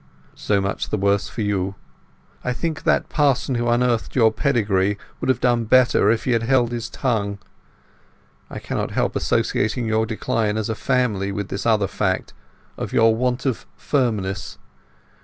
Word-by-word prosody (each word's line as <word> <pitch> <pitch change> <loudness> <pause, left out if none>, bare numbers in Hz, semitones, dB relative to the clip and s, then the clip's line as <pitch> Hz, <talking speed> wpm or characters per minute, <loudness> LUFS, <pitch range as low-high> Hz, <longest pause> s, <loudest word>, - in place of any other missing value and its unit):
"So 100 -1 0
much 100 +1 -2
the - - 0
worse 100 0 +1
for 110 - -4
you. 100 -1 -1 0.7
I 125 - -1
think 160 +4 -4
that - - +2
parson 140 -3 +1
who 120 -1 -1
unearthed 120 -1 +1
your 115 -4 +5
pedigree 105 -7 +1 0.2
would - - -2
have 130 - +2
done 120 -2 +2
better 120 -3 +4
if 115 0 +1
he 130 - 0
had 115 -1 +2
held 120 0 +2
his 120 0 -4
tongue. 105 -6 -1 1.1
I - - -7
cannot - - -3
help - - -1
associating 115 +3 0
your 110 0 +1
decline 110 0 -1
as 110 0 -2
a - - 0
family 110 -5 0
with 100 0 -4
this 100 - -3
other 110 -3 +3
fact—of 95 -1 -5
your 115 0 +4
want 125 +2 -1
of 130 -4 -2
firmness. 105 -9 -1
115 Hz, 160 wpm, -22 LUFS, 100-125 Hz, 1.1 s, your